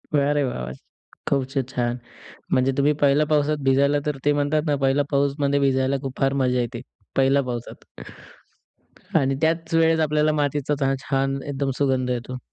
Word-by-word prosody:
अरे 145 0 +2
वाह, 125 - -3
वाह! 65 0 -6 0.6
खूप 140 -2 +1
छ - - -5
छान. 120 -1 -1 0.6
म्हणजे 130 +1 +3
तुम्ही 145 +2 +4
पहिल्या 145 +2 +4
पावसात 150 0 +1
भिजायला 140 +2 +3
तर 150 -2 -1
ते 145 - +4
म्हणतात 145 +1 +1
ना, 145 -1 +1
पहिला 135 +1 +2
पाऊसमध्ये 140 0 +1
भिजायला 135 0 +1
खूप 135 -1 -6
फार 135 0 +2
मजा 125 -1 +1
येते. 120 0 -4 0.4
पहिल्या 135 +1 +3
पावसात. 120 -2 -6 1.3
आणि 135 0 +1
त्याच 165 +1 0
वेळेस 165 0 +3
आपल्याला 155 0 +2
मातीचा 145 -1 0
चा 135 0 +2
छान 135 0 -1
एकदम 140 -1 -2
सुगंध 130 -3 +1
येतो. 125 +1 -4
140 Hz, 165 wpm, -23 LUFS, 135-145 Hz, 1.3 s, तुम्ही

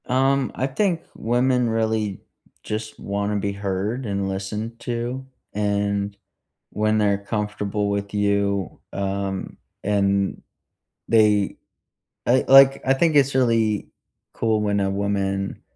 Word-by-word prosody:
Um, 135 +1 +2
I 130 - 0
think 170 +4 0
women 125 +1 +1
really 110 -3 -1 0.4
just 110 0 -5
wanna 100 +1 -2
be 100 0 -1
heard 100 +5 -2
and 100 -2 -2
listened 105 +4 -4
to, 120 +2 -3 0.3
and 100 -1 -1 0.6
when 110 +1 +1
they're 100 -2 +2
comfortable 105 0 -2
with 100 0 -2
you, 100 -2 0
um, 100 -1 -3 0.3
and 100 -1 +1 0.7
they 105 -3 +3 0.7
I, 130 +2 +4
like 135 0 +7
I 135 - +4
think 160 +2 +2
it's 140 -1 +4
really 115 -5 +2 0.5
cool 110 -1 +1
when 100 -1 +1
a 95 0 +1
woman 100 -1 -2
105 Hz, 120 wpm, -23 LUFS, 100-120 Hz, 0.7 s, like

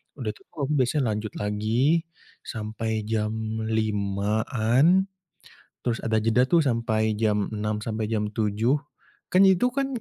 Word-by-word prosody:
udah - - -3
itu - - -19
aku 145 0 -2
biasanya 130 +3 +1
lanjut 105 0 -4
lagi 115 +11 +1 0.4
sampai 110 0 -3
jam 110 0 0 0.3
5.00-an 110 - +2 0.8
terus 115 -2 -1
ada 110 -1 +1
jeda 115 +3 +3
tuh 170 - +6
sampai 115 -5 0
jam 105 -2 +1
6.00 105 0 -2
sampai 110 0 -3
jam 105 -1 0
7.00, 110 +4 +1 0.6
kan 185 - +4
itu 190 +7 +3
kan 275 +1 -1
110 Hz, 130 wpm, -25 LUFS, 105-130 Hz, 0.8 s, tuh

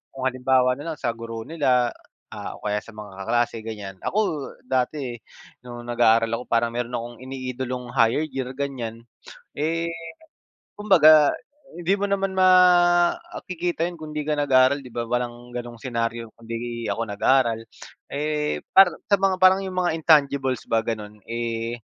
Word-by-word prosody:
kung 130 -1 -4
halimbawa 130 0 +2
na 145 +6 -6
lang - - -25
sa 120 - -1
guro 115 -1 -7
nila, 130 -7 +1 0.4
ah, - - -7
o - - -21
kaya 105 0 0
sa 115 - -15
mga 105 -1 -9
kaklase, 120 +1 +1
ganyan. 105 -4 -8
Ako 210 - -1 0.4
dati 130 -1 -2 0.5
no'ng 120 0 -8
nag-aaral 115 -1 +3
ako, - - -7
parang 115 0 +1
meron 120 0 -3
akong 120 0 -6
iniidolong 130 -1 -5
higher 115 +6 +3
year, 135 -4 -4
ganyan. 125 -5 -5 0.5
Eh, 165 +3 -1 0.9
kumbaga, 155 -8 +6 0.4
hindi 175 +2 +1
mo 205 - 0
naman 195 -1 -1
makikita 175 -1 +3
'yon 175 0 -6
kung 155 -1 -8
'di 150 - -2
ka 155 - +1
nag-aaral, 135 -1 +4
'di - - -11
ba? 120 - -1
Walang 120 0 -3
ganong 120 -1 -6
senaryo 115 -2 -3
kung 115 - -17
'di 115 0 -5
ako 115 - -2
nag-aral. 115 +2 +2 0.5
Eh, 150 +1 -2
para 190 -2 +7 0.2
sa 200 - +6
mga 195 -1 +3
parang 185 +1 +7
'yong 185 -1 -6
mga 175 - +1
intangibles 140 -5 +3
ba, 115 - +3
gano'n, 105 -2 -5
eh, 115 0 -3
125 Hz, 155 wpm, -24 LUFS, 115-155 Hz, 0.9 s, para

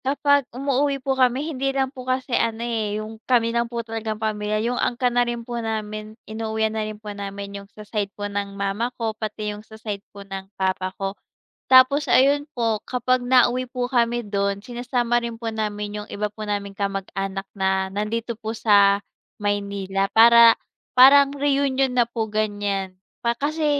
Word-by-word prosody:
Kapag 285 0 +2
umuuwi 275 +2 0
po 270 0 -1
kami, 260 +2 +2
hindi 270 0 -1
lang 270 0 -1
po 255 0 -8
kasi 255 0 -1
ano 230 0 0
eh, 220 -3 -1
yung 220 +1 -7
kami 230 -2 +3
ng 235 0 0
po 235 -1 -4
talagang 225 -1 -4
pamilya, 215 -1 -1
yung 245 +1 -1
angkan 245 0 0
na 245 - +3
rin 240 -1 -2
po 240 0 -4
namin, 215 -1 -4
inuwian 220 0 -2
na 220 - -1
rin 215 0 -5
po 210 -1 -8
namin 200 0 -6
yung 200 - -16
sa 210 0 -12
side 205 -1 -2
po 205 - -4
ng 200 -1 -4
mama 200 +4 -1
ko, 225 -2 -2
pati 215 -1 -4
yung 205 - -9
sa 220 0 -14
side 210 -2 -5
po 200 -1 -11
ng 195 0 -7
papa 185 0 0
ko. 195 0 -3 0.5
Tapos 260 +3 +6
ayun 285 +2 +4
po, 230 -3 0
kapag 250 0 0
nauwi 250 0 +4
po 250 0 -3
kami 240 -1 +1
dun, 200 -1 -1
sinasama 240 0 -1
rin 235 -1 -4
po 225 0 -4
namin 210 -1 -3
yung 210 - -7
iba 210 0 -3
po 215 +1 -8
naming 200 -1 -4
kamag-anak 195 0 -3
na 190 -1 0
nandito 220 +3 -3
po 220 0 -4
sa 200 -2 +4 0.4
Maynila, 200 -1 -1
para, 230 0 +8 0.4
parang 275 +2 +7
reunion 275 -2 +1
na 245 -1 +2
po 225 -2 -3
ganyan, 205 -3 -1 0.2
pa 235 0 0
kasi 305 +5 -1
220 Hz, 180 wpm, -23 LUFS, 205-245 Hz, 0.5 s, para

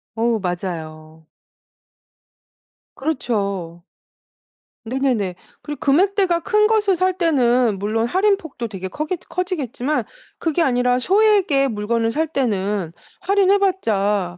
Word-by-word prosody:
어 230 0 +1
맞아요. 160 -4 -6 1.7
그렇죠. 200 - -2 1.0
네네네. 235 -7 -1 0.3
그리고 295 -1 -7
금액대가 360 +4 +2
큰 425 +4 +3
것을 420 -4 +2
살 370 +1 0
때는 250 - +2
물론 215 +3 -1
할인폭도 365 - 0
되게 190 -2 -6
커겠 310 - -4
커지겠지만 305 - -2 0.4
그게 325 +1 0
아니라 250 -3 +2
소액의 385 - +3
물건을 225 +2 -1
살 315 +4 0
때는 205 - -1 0.3
할인해 395 +1 +3
봤자 205 - 0
255 Hz, 240 characters per minute, -20 LUFS, -, 1.7 s, 큰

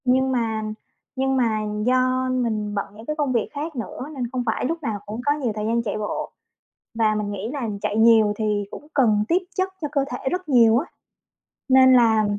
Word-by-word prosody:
Nhưng 260 +1 +3
mà 225 -3 -1 0.5
nhưng 265 0 0
mà 225 -4 +1 0.3
do 255 +1 +2
mình 220 -5 -1
bận 200 - -1
những 220 +2 -11
cái 305 - -3
công 290 -4 0
việc 230 -3 0
khác 300 +2 -5
nữa 255 +3 -6
nên 245 -3 -3
không 255 -2 -2
phải 225 - -1
lúc 330 +4 -3
nào 220 -6 -2
cũng 215 +3 -5
có 290 - +3
nhiều 275 -6 -2
thời 210 0 -3
gian 230 +1 +1
chạy 215 -2 -3
bộ. 210 -1 -4 0.7
Và 215 -1 +3
mình 210 -1 -2
nghĩ 205 +2 -4
là 260 -6 -3
chạy 210 - -1
nhiều 220 -2 +5
thì 210 -2 0
cũng 295 - -10
cần 215 -7 +3
tiếp 340 - +3 0.2
chất 375 0 0
cho 300 - -1
cơ 280 -2 +1
thể 265 - -3
rất 365 -2 -3
nhiều 230 -4 +5
á. 285 - 0 0.8
Nên 260 0 +7
là 225 -3 +5
240 Hz, 215 wpm, -23 LUFS, 220-265 Hz, 0.8 s, Nên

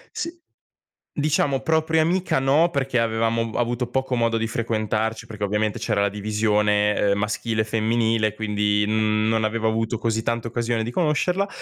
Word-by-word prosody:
S 335 - -2 0.9
diciamo 145 -2 +1
propria 160 0 +2
amica, 175 -3 +1
no, 145 +6 +3
perché 135 -3 0
avevamo 115 0 0
avuto 120 0 -1
poco 130 0 -1
modo 115 -1 +1
di 115 0 0
frequentarci, 110 -1 -2
perché 105 -2 -4
ovviamente 105 +1 -1
c'era 105 -2 0
la 100 - +2
divisione, 105 0 +1 0.2
ehm, 100 - +1
maschile 110 +2 -1
e - - +1
femminile. 110 0 +1
Quindi, 105 -1 0
mhmm, 110 0 +1
non 110 -1 +1
avevo 110 0 0
avuto 115 +1 -1
così 110 0 -1
tanta 115 0 -2
occasione 120 -1 -1
di 115 - -4
conoscerla, 180 +6 +1
115 Hz, 160 wpm, -23 LUFS, 110-120 Hz, 0.9 s, no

